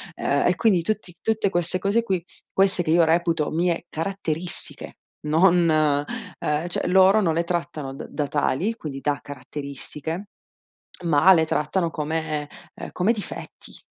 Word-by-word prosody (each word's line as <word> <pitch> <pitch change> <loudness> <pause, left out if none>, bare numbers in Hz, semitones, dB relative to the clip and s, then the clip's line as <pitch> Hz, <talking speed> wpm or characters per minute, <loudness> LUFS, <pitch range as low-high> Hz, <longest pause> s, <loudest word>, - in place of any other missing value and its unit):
Ehm, - - +1
e - - +3
quindi 195 -7 +3
tutti 195 -2 -3
tutte 220 -2 +1
queste 175 0 -1
cose 200 +5 +1
qui, 190 -6 -1 0.3
queste 190 -2 +2
che 155 - 0
io 170 +1 +5
reputo 165 -1 +2
mie 170 +1 0
caratteristiche, 170 0 -4 0.3
non, 170 +3 +4 0.7
uhm, 150 +3 -1
cioè - - -2
loro 190 +3 +6
non 170 -6 +2
le 170 +2 +1
trattano 160 -5 -3
da - - -7
da 145 -2 -2
tali, 155 +9 0
quindi 140 -9 -7
da 145 +1 0
caratteristiche, 145 +6 -7 0.8
ma 170 +3 +6
le 160 -3 +4
trattano 165 +3 0
come 155 -1 -2 0.3
uhm, - - -8
come 190 +5 +2
difetti. 210 -4 -9
170 Hz, 145 wpm, -24 LUFS, 150-190 Hz, 0.8 s, loro